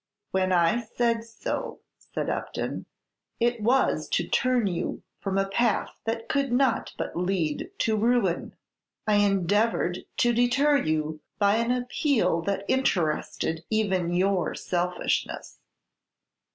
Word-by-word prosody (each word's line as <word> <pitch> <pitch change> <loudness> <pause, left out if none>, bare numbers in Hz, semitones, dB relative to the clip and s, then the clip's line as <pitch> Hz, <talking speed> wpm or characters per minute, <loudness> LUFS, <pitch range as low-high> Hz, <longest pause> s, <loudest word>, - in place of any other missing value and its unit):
"When 185 0 +1
I 175 +6 +3
said 230 0 0
so," 230 0 -5 0.2
said - - -5
Upton, - - -3 0.5
"it 235 -1 +1
was 250 +5 +2
to - - 0
turn 255 -3 +2
you 175 -3 -2 0.2
from 195 -1 -2
a 195 0 +2
path 215 +2 +1
that 225 0 -2
could 275 -2 0
not 255 -1 +2
but - - -4
lead 180 - -1
to 220 - +1
ruin; 220 -5 +1 0.5
I 210 -1 +3
endeavored 200 -1 +2 0.2
to 240 0 +3
deter 270 +5 +3
you 155 - -1 0.2
by 205 +1 +3
an 230 +1 0
appeal 245 - +1
that 200 0 -1
interested 165 - 0
even 190 -6 +1
your 185 +1 +1
selfishness." 180 0 -2
210 Hz, 125 wpm, -26 LUFS, 180-240 Hz, 0.5 s, I